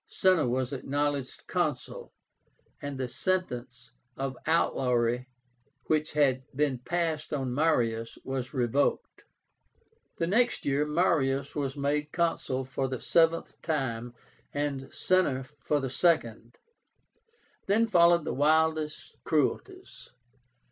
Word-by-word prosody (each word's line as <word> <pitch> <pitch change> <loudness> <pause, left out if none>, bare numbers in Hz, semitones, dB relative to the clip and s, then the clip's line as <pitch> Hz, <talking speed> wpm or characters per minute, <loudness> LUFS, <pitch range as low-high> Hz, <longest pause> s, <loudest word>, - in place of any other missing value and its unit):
Cinna 185 -7 +3
was 130 +1 -1
acknowledged 140 0 -2
Consul, - - -2 0.7
and 145 -1 -5
the 130 -1 -2
sentence 125 -8 -2 0.3
of 135 -1 -3
outlawry 125 -6 +1 0.6
which 155 0 0
had 135 -4 +3
been 140 -3 +1
passed 160 +2 -2
on 135 -4 -2
Marius 115 -6 +1
was 130 -2 -4
revoked. 130 +1 0 0.9
The 165 - 0
next 240 +7 +2
year 145 +2 +1
Marius 140 -4 +1
was 140 -1 -2
made 145 +1 -1
Consul 165 -6 -1
for 135 +1 -2
the 130 -2 -4
seventh 165 0 +1
time, 120 -6 -2 0.4
and 140 -2 -2
Cinna 175 -8 +1 0.2
for 145 +2 0
the 135 -2 -3
second. 120 -8 +1 1.1
Then 215 +4 +4
followed 170 -5 +4
the - - -2
wildest 155 +1 +1
cruelties. 150 -4 -2
145 Hz, 110 wpm, -29 LUFS, 130-160 Hz, 1.1 s, Then